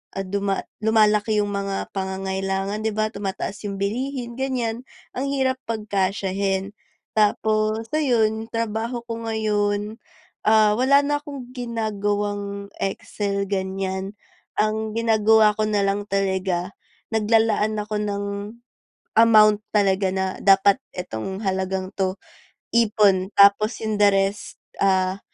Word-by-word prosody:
at 195 -1 -3
duma 200 -1 -1 0.2
lumalaki 215 -1 +3
'yung 205 - -3
mga 200 -1 -3
pangangailangan 195 +1 -2
di 220 - +1
ba 215 0 +1
tumataas 200 0 -5
'yung 200 -1 -5
bilihin 240 +3 -3
ganiyan 250 -2 -2 0.3
ang 265 - -1
hirap 265 -2 0
pagkasyahin. 195 -2 -1 0.4
Tapos 215 +1 +1
ayon, 225 -7 +1
trabaho 230 +1 -2
ko 230 0 -4
ngayon, 210 -1 -1 0.5
ah, 215 -1 +5
wala 275 +3 +5
na 290 0 +1
akong 280 -5 -8
ginagawang 205 -4 -3
excel 200 0 -2
ganiyan 190 0 -3 0.4
ang 215 0 0
ginagawa 220 -1 +4
ko 215 - +1
na 210 -1 +1
lang 200 +1 -1
talaga, 190 -1 -1 0.4
naglalaan 220 -1 +2
ako 210 +1 -4
ng, 200 -1 -2 0.9
amount 215 -2 +6
talaga 195 -2 +2
na 190 0 0
dapat 200 +4 +5 0.2
itong 180 - -5
halagang 190 0 -2
'to 190 0 -1 0.6
ipon, 210 -5 +3
tapos 200 +3 +5
'yung 215 -1 -1
the 205 - +7
rest, 195 +1 -1 0.2
ah, 190 0 +2
205 Hz, 115 wpm, -23 LUFS, 195-220 Hz, 0.9 s, the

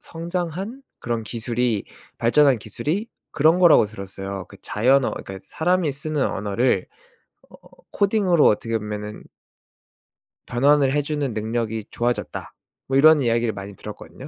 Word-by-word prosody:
성장한? 175 - -5 0.2
그런 115 -1 -2
기술이 115 -1 -1 0.3
발전한 130 +1 +4
기술이 155 - -3 0.2
그런 160 +5 +3
거라고 170 -11 +6
들었어요. 100 -2 -7
그 - - -14
자연어, 130 +5 +2
그러니까 95 0 -7
"사람이 175 -2 0
쓰는 150 0 -1
언어를 105 +6 0 0.6
어 - - -20 0.4
코딩으로 200 -5 +3
어떻게 115 +2 +1
보면은 105 0 -6 1.2
변환을 140 +2 +3
해 145 - +2
주는 145 -4 -2
능력이 110 0 -2
좋아졌다." 120 +1 -3 0.3
뭐 135 - +1
이런 155 +1 +7
이야기를 115 -2 +1
많이 100 +1 -8
들었거든요. - - -10
125 Hz, 325 characters per minute, -23 LUFS, 110-155 Hz, 1.2 s, 이런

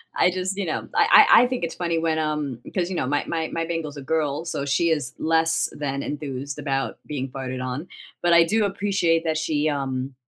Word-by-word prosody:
I 180 - +4
just, 185 +1 -3
you 200 - -1
know, 160 - -3
I - - +7
I - - +9
I - - +2
think 255 -4 -3
it's 165 - -3
funny 170 -2 -1
when, 160 -1 0
um 150 -5 -2
'cause, 175 -1 0
you 190 - -3
know, 130 - -1
my 145 +2 0
my 160 -1 -2
my 165 0 -2
Bengal's 160 -3 -4
a - - -6
girl, 150 +2 -1
so 140 -4 -3
she 170 +4 +2
is 150 -6 -1
less 165 0 +2
than 140 -2 -2
enthused 140 -2 -5
about 135 -2 -2
being 135 -3 -4
farted 130 -1 -5
on, 130 +7 -4 0.3
but 175 -1 +3
I 170 0 +7
do 210 +5 +1
appreciate 195 -4 +1
that 160 -1 0
she, 155 -1 0
um, 135 -2 -3
155 Hz, 220 wpm, -24 LUFS, 140-170 Hz, 0.3 s, I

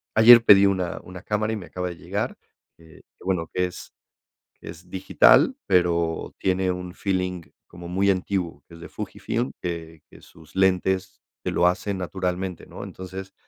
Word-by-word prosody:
ayer 115 +1 +9
pedí 100 -3 +7
una 95 -3 0
una 90 0 -10
cámara 105 +2 -1
y - - -1
me 95 -5 -8
acaba 90 0 -4
de 85 - -8
llegar, - - -3 0.4
eh, 80 -1 -17 0.2
que - - -18
bueno, 90 -3 -1
que 90 0 +1
es 90 - -11 0.7
que - - -10
es 85 +2 -11
digital, 95 - +4
pero 85 -3 +1
tiene 95 0 0
un 90 0 -5
feeling 90 -2 -2 0.2
como 85 0 -11
muy 95 +3 +2
antiguo 95 -2 -2
que 85 - -14
es 85 - -13
de - - -9
Fujifilm, 120 +3 -4
que 80 -2 -6
que - - -16
sus 80 -2 -18
lentes 95 0 +1 0.2
te - - -2
lo 90 - +2
hacen 95 +2 0
naturalmente, 90 0 -3
¿no? - - -9
Entonces 95 +1 -9
90 Hz, 175 wpm, -24 LUFS, 90-95 Hz, 0.7 s, ayer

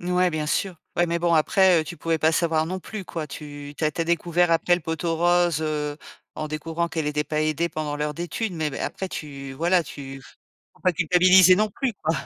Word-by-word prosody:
N 175 +1 -4
ouais, 180 0 +3
bien 155 -1 -2
sûr. 185 +4 -1 0.2
Ouais, 175 0 +3
mais 170 0 -1
bon 170 -1 +2
après, 180 +2 +4
heu, - - -4
tu 170 +2 -8
pouvais 165 -1 -1
pas 160 +1 +3
savoir 160 -1 +1
non 185 +2 -4
plus, 210 -1 -7
quoi. 160 -3 -5
Tu 145 0 -9
tu 155 - -2
as 155 - +2
tu 160 - -5
as 165 - +1
découvert 170 +1 +1
après 165 +1 +3
le 175 - -3
pot 160 +1 -4
aux 165 -1 0
roses, 175 -2 +2
heu, 150 -1 -2 0.4
en 155 0 -4
découvrant 165 +2 -3
qu'elle 160 -2 -3
était 150 0 -1
pas 155 +1 -2
aidée 155 +2 0
pendant 150 -2 -4
l'heure 150 0 -2
d'études, 175 +6 -3
mais 160 -2 -1
m 135 - -8
après, 190 - -4
tu 140 -5 -7
voila, 175 +5 +2
tu 135 -3 -9 0.5
faut - - -26
pas 185 - +2
culpabiliser 180 +2 +6
non 215 0 +1
plus, 260 +2 -2
quoi. 160 +1 +1
165 Hz, 240 wpm, -24 LUFS, 150-175 Hz, 0.5 s, culpabiliser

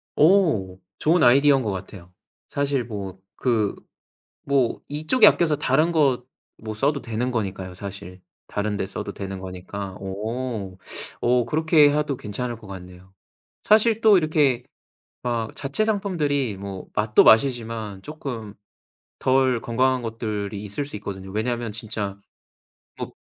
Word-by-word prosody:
어 150 - +3 0.2
좋은 165 +1 +3
아이디어인 135 +2 +6
것 110 - -1
같아요. 90 -1 -8 0.4
사실 140 -2 0
뭐 100 -5 -6 0.2
그 115 -5 +1 0.7
뭐 135 -4 +1
이쪽에 155 - +3
아껴서 160 -6 +4
다른 150 +4 +2
거 140 -7 +2 0.3
뭐 110 -1 -6
써도 140 +6 +1
되는 120 +2 -2
거니까요, 95 -5 -3
사실. 95 -1 -8 0.3
다른 105 0 -2
데 - - -1
써도 100 +1 -5
되는 95 -1 -6
거니까. 95 +1 -7
어 105 0 -4 0.4
어 120 0 +3
그렇게 155 -1 +4
해도 150 -2 0
괜찮을 120 +3 -4
것 110 -3 -14
같네요. 90 0 -11 0.5
사실 220 +1 +4
또 215 -3 +7
이렇게 150 -6 +2 0.6
막 115 -2 -2
자체 140 +9 -1
상품들이 150 - 0
뭐 95 -1 -7
맛도 105 0 +4
맛이지만 110 -4 +2
쪼끔 125 -9 -6 0.7
덜 130 -2 +2
건강한 130 +2 +1
것들이 105 -3 -4
있을 105 +7 -2
수 145 - -7
있거든요. 95 -2 -7
왜냐하면 115 +1 -2
진짜 105 -2 -4 0.8
뭐 - - -5
115 Hz, 270 characters per minute, -24 LUFS, 100-140 Hz, 0.8 s, 또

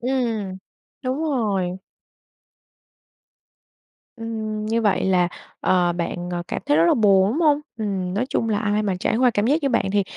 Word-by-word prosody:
Ừm, 230 -7 -1 0.5
đúng 260 +4 -2
rồi. 200 - -1 2.4
Ừm, 220 -2 -4
như 230 +1 +1
vậy 205 - +2
là, 180 -2 +3 0.3
ờ, 175 -2 +2
bạn, 175 +1 -4
ờ, 175 0 -2
cảm - - -4
thấy 145 - +3
rất 165 - +5
là - - +4
buồn, 200 -2 +4
đúng 315 - -1
hông? 300 -2 +4 0.2
Ừm, 190 -4 -2
nói 230 +5 0
chung 225 - -1
là 210 -1 +1
ai 210 0 0
mà 195 -3 0
trải 220 - +1
qua 250 0 +4
cảm 210 0 0
giác 300 +4 +2
như 275 - +2
bạn 230 - +1
thì, 205 -1 +3
210 Hz, 175 wpm, -22 LUFS, 185-235 Hz, 2.4 s, rất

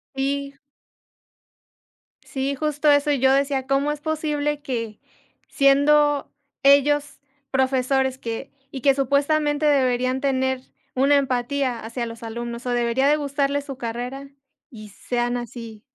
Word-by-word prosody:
Sí. 280 +1 -2 1.7
Sí, 275 +1 -2
justo 300 +1 0
eso, 285 +1 +3
yo 265 -2 +3
decía: 275 -1 +1
"¿Cómo 275 +2 +1
es 295 0 -5
posible 295 -2 -2
que 230 -6 -4 0.5
siendo 285 +1 +3 0.3
ellos 285 +1 +3 0.3
profesores 265 0 +1
que 230 +1 -6 0.2
y 265 - -6
que 275 +2 +4
supuestamente 290 +2 +1
deberían 255 -2 +2
tener 260 -2 0 0.3
una 275 +3 +4
empatía 260 -1 -1
hacia 230 +2 -4
los 230 0 -9
alumnos, 235 +1 -6
o 250 - -1
debería 240 +2 +1
de 295 - +5
gustarle 285 -1 -1
su 275 -2 -8
carrera 250 +3 -5 0.4
y 215 -6 -11
sean 240 +4 -2
así?". 230 -2 -8
270 Hz, 125 wpm, -23 LUFS, 245-285 Hz, 1.7 s, de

